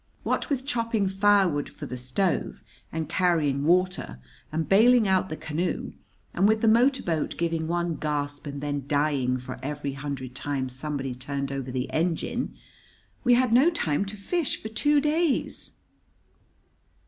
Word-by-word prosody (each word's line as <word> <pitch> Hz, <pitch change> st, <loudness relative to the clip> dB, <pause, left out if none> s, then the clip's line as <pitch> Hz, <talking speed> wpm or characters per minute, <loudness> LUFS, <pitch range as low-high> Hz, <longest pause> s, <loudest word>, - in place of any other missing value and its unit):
What -, -, -1 dB
with 270 Hz, -2 st, -1 dB
chopping 230 Hz, -6 st, 0 dB
firewood 190 Hz, -6 st, +3 dB
for -, -, -9 dB
the 125 Hz, -, -6 dB
stove, 130 Hz, +9 st, -1 dB, 0.3 s
and 160 Hz, -1 st, -3 dB
carrying 155 Hz, -6 st, +1 dB
water, 175 Hz, -, +1 dB, 0.3 s
and 160 Hz, +1 st, -1 dB
bailing 225 Hz, +3 st, +5 dB
out 190 Hz, 0 st, +2 dB
the 155 Hz, -, -4 dB
canoe, 165 Hz, +3 st, -3 dB, 0.4 s
and 190 Hz, +3 st, +3 dB
with 220 Hz, 0 st, +2 dB
the 225 Hz, -, +3 dB
motor 250 Hz, +5 st, +4 dB
boat 160 Hz, -3 st, -1 dB
giving 165 Hz, -1 st, -1 dB
one 170 Hz, -1 st, -1 dB
gasp 145 Hz, -1 st, -3 dB
and 140 Hz, 0 st, -5 dB
then 145 Hz, -2 st, -3 dB
dying 145 Hz, -3 st, +1 dB
for 125 Hz, 0 st, -7 dB
every 145 Hz, 0 st, -4 dB
hundred 135 Hz, -2 st, -5 dB
times 135 Hz, -1 st, -3 dB
somebody 135 Hz, -2 st, -3 dB
turned 140 Hz, +2 st, -4 dB
over 135 Hz, -2 st, -4 dB
the 125 Hz, 0 st, -2 dB
engine, 165 Hz, +1 st, -1 dB, 0.7 s
we 245 Hz, -1 st, +5 dB
had 250 Hz, -2 st, +2 dB
no 265 Hz, +8 st, +6 dB
time 190 Hz, -, 0 dB
to 205 Hz, +2 st, -7 dB
fish 320 Hz, -, -1 dB
for 220 Hz, -, -6 dB
two 290 Hz, +7 st, +3 dB
days. 305 Hz, 0 st, 0 dB
160 Hz, 155 wpm, -26 LUFS, 140-210 Hz, 0.7 s, no